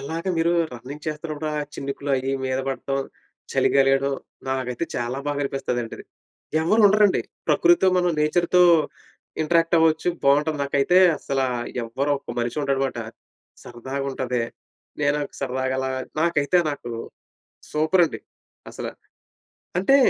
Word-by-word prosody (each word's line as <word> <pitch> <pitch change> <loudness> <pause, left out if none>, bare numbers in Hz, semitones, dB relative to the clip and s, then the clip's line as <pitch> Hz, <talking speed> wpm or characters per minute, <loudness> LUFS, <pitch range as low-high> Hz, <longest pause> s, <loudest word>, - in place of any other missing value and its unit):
అలాగ 160 +4 -4
మీరూ 165 +1 +2 0.2
రన్నింగ్ 130 +5 -9
చేస్తనప్పుడు, 155 0 -4
ఆ - - 0 0.2
చినుకులు 140 +1 -4
అయ్యి 135 +1 -2
మీద 130 0 -1
పడటం, 135 +1 -2 0.5
చలిగా 135 - +4
లేడం, 135 0 +2 0.4
నాకైతే 130 +2 -2
చాలా 120 +3 -2
బాగా 145 0 -1
అనిపిస్తదంటది. 125 -4 -3 0.6
ఎవ్వరుండరండి. 210 +1 +4 0.3
ప్రకృతితో 345 - +5
మనం 180 -1 +2
నేచర్‌తో 175 +3 +3 0.8
ఇంటరాక్టవ్వొచ్చు, 165 0 +3 0.2
బావుంటది. 150 +2 +3
నాకైతే 140 +5 +2 0.2
అస్సలా 135 -2 -1 0.4
ఎవ్వరొక్క 140 +4 -2
మనిషి 120 +4 -2
ఉండడుమాట. 135 -2 0 0.7
సరదాగుంటది. 130 0 -3 0.6
నే 145 - +2
నాకు 145 - -4
సరదాగలా 130 0 -1 0.3
నాకైతే 170 0 +2
నాకు 120 -4 -6 0.8
సూపరండి 160 +2 +2 0.5
అసల. - - -6 0.9
అంటే, 235 +10 +5
140 Hz, 105 wpm, -23 LUFS, 130-165 Hz, 0.9 s, ప్రకృతితో